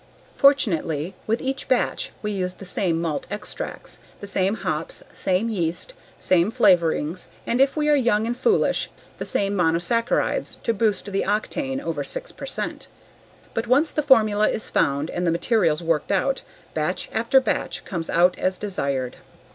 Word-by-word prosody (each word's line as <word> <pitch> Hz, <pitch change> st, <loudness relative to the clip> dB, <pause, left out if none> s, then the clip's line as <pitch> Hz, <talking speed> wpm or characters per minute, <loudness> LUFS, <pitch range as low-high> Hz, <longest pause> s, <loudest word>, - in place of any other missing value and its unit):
Fortunately, 180 Hz, -, +2 dB
with 225 Hz, +2 st, 0 dB
each 270 Hz, +1 st, -2 dB
batch 255 Hz, -, +1 dB
we 210 Hz, -, -1 dB
use 185 Hz, -2 st, -2 dB
the 195 Hz, -, -11 dB
same 180 Hz, -2 st, 0 dB
malt 165 Hz, -3 st, -2 dB
extracts, 205 Hz, +1 st, -6 dB, 0.2 s
the -, -, -7 dB
same 195 Hz, +1 st, 0 dB
hops, -, -, -3 dB
same 190 Hz, +4 st, 0 dB
yeast, 180 Hz, -, -2 dB, 0.2 s
same 180 Hz, +1 st, +3 dB
flavorings 180 Hz, -7 st, +2 dB, 0.2 s
and, 240 Hz, +3 st, +1 dB
if 275 Hz, +2 st, +3 dB
we 300 Hz, 0 st, +1 dB
are 300 Hz, -, +5 dB
young 235 Hz, -5 st, +2 dB
and 240 Hz, +1 st, -1 dB
foolish, 430 Hz, -, +2 dB, 0.3 s
the -, -, -3 dB
same 200 Hz, 0 st, 0 dB
monosaccarides 175 Hz, +7 st, +1 dB
to 230 Hz, -, +1 dB
boost 210 Hz, -2 st, +1 dB
the 195 Hz, -, 0 dB
octane 265 Hz, +7 st, -1 dB
over 285 Hz, -, -3 dB
six -, -, -6 dB
percent. -, -, -5 dB, 0.7 s
But 225 Hz, +1 st, -2 dB
once 280 Hz, +6 st, +3 dB
the 300 Hz, -, 0 dB
formula 215 Hz, -7 st, +4 dB
is -, -, -4 dB
found 140 Hz, +3 st, +1 dB
and 175 Hz, 0 st, -1 dB
the -, -, +3 dB
materials 170 Hz, -2 st, +1 dB
worked 165 Hz, 0 st, 0 dB
out, 265 Hz, +8 st, +1 dB, 0.3 s
batch -, -, -1 dB
after 235 Hz, +4 st, +4 dB
batch 260 Hz, -, -2 dB
comes 170 Hz, -3 st, -4 dB
out 180 Hz, +2 st, +4 dB
as 185 Hz, 0 st, 0 dB
desired. 140 Hz, -11 st, -2 dB
205 Hz, 160 wpm, -23 LUFS, 175-245 Hz, 0.7 s, are